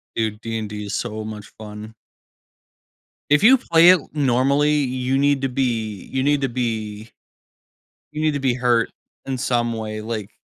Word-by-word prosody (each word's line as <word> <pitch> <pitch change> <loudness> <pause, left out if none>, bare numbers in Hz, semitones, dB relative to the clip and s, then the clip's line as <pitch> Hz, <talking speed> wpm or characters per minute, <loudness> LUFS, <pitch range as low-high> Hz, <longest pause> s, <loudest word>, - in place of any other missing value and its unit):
Dude, 110 -1 -2
D&D 110 -2 -4
is 100 - -5
so 110 -1 -3
much 105 -1 -9
fun. 105 0 -9 1.4
If 145 +4 +5
you 260 +4 +8
play 170 -9 +4
it 185 - +5
normally, 140 +1 +2
you 130 -2 0
need 140 -1 +2
to - - +2
be 115 -6 -2
you 130 - 0
need 145 +1 +2
to 135 - 0
be 110 -3 -3 1.0
you 150 - -6
need 155 -1 +2
to 145 - -2
be 130 -3 +2
hurt 120 -2 +1 0.3
in 135 -1 -3
some 120 -1 0
way, 110 -1 -5
like 110 -2 -6
120 Hz, 160 wpm, -21 LUFS, 110-135 Hz, 1.4 s, you